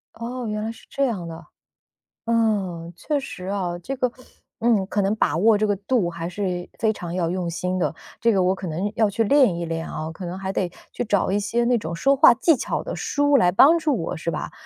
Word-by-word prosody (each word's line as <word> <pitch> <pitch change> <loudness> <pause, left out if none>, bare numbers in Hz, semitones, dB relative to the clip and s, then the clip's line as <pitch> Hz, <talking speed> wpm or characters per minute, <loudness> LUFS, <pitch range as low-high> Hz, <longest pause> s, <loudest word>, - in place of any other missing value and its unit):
哦， 245 +2 -5
原 210 0 -2
来 220 - -3
是 230 - -15
这 275 - 0
样 200 -9 -3
的。 165 0 -9 0.8
嗯， 200 -7 0
确 290 - -1
实 185 -9 -8
啊， 185 -3 -2
这 270 +10 -5
个， 250 -2 0 0.5
嗯， 225 -4 +2
可 205 - 0
能 200 +2 +1
把 215 - +1
握 215 +3 +5
这 215 - +1
个 205 -1 +1
度 200 -1 0
还 170 0 -5
是 180 -2 -3
非 220 -1 +2
常 175 -4 -6
要 175 -2 0
用 180 -1 -2
心 180 +2 -2
的， 175 - 0 0.3
这 230 -1 +3
个 190 -3 +2
我 185 +1 +3
可 190 -1 -6
能， 180 +6 -2
要 220 -2 +3
去 225 +3 0
练 260 -5 +4
一 170 - -3
练 165 0 -4
啊， 155 +1 -5
可 180 +3 -8
能 175 +2 -5
还 190 0 -3
得 185 -2 -1 0.2
去 - - -3
找 205 -3 +1
一 205 - +2
些 230 +4 0
那 245 0 +3
种 170 -6 -4
说 275 +11 +3
话 265 - +7
技 320 +7 +3
巧 - - -3
的 - - -5
书 285 -1 +2
来 180 -7 +4
帮 285 - +6
助 300 -5 +1
我， 165 - -3
是 170 - -3
吧？ - - -4
200 Hz, 255 characters per minute, -23 LUFS, 175-235 Hz, 0.8 s, 话